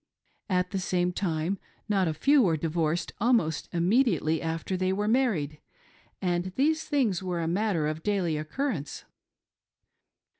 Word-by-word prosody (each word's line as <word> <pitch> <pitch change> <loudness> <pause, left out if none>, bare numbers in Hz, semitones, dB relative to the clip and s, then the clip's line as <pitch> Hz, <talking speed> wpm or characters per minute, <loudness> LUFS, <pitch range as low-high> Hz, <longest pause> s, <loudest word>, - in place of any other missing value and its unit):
At 180 -1 +1
the 195 - -1
same 180 -1 0
time 175 0 -1 0.3
not 195 -4 +2
a 155 - -1
few 280 - +4
were 170 -8 +2
divorced 165 +1 -1
almost 210 - +1
immediately 175 - +2
after 165 +3 -2
they 185 0 0
were 205 +2 -1
married, 205 - +1 0.6
and 175 -1 0
these 315 +4 +2
things 245 - +1
were 180 -2 -2
a 165 - -1
matter 180 -2 +1
of 155 +1 -3
daily 185 -5 0
occurrence. 155 - -3
180 Hz, 140 wpm, -28 LUFS, 160-210 Hz, 0.6 s, few